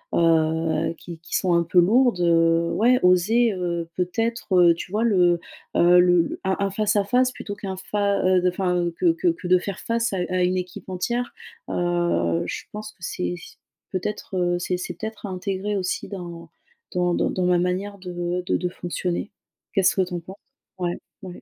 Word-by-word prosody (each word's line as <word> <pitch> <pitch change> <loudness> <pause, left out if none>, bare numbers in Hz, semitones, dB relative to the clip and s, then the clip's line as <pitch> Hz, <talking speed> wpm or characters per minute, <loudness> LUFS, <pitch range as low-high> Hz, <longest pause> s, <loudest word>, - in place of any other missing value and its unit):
heu 160 -1 +2
qui 170 -2 -9
qui 165 - -5
sont 180 -2 +2
un 170 - +3
peu 170 +2 +3
lourdes, 230 +3 +4
heu 165 0 +3
ouais 250 +3 +4
oser, 210 +6 +4
heu, 170 -2 -3
peut-être, 185 -2 +2
tu 180 - -7
vois 215 +3 0
le, 180 -6 +3 0.4
heu, 175 +1 +6
le 180 -1 +5
le 165 - -4
un 190 0 0
un 200 - +1
face 210 +2 0
à 205 - +3
face 250 +4 +2
plutôt 205 -4 -7
qu'un 195 -2 -5
fa 200 +1 0
heu, 185 0 +4
de 180 - +3
enfin 180 -1 0
que 340 -2 +4
que 340 +2 +1
que 325 - -3
de 185 - +6
faire 195 0 -5
face 230 -1 -1
à - - -1
à 185 0 +1
une 180 +1 +1
équipe 180 +1 -6
entière. 235 +7 -2 0.4
Heu, 175 - 0
je - - -5
pense 215 0 -7
que - - -37
c'est 175 0 -2
c'est - - -13 0.3
peut-être, 190 0 -4
heu, 175 0 +1
c'est 180 +1 -1
c'est 180 0 -5
peut-être 220 +3 -6
à - - -4
intégrer 190 +2 -3
aussi 185 -1 -2
dans 170 -4 -8 0.4
dans 180 -1 +1
dans - - 0
dans 185 - -1
ma 180 0 +4
manière 190 +3 -2
de 180 0 -3
de - - +1
de 180 - -2
fonctionner. 175 +2 -3 0.4
Qu'est-ce 190 -3 +3
que 190 - +2
tu 180 0 -7
en - - -2
penses? 190 +4 -11 0.4
Ouais 175 -1 -2 0.2
ouais. 180 -1 -9
180 Hz, 200 wpm, -23 LUFS, 175-200 Hz, 0.4 s, heu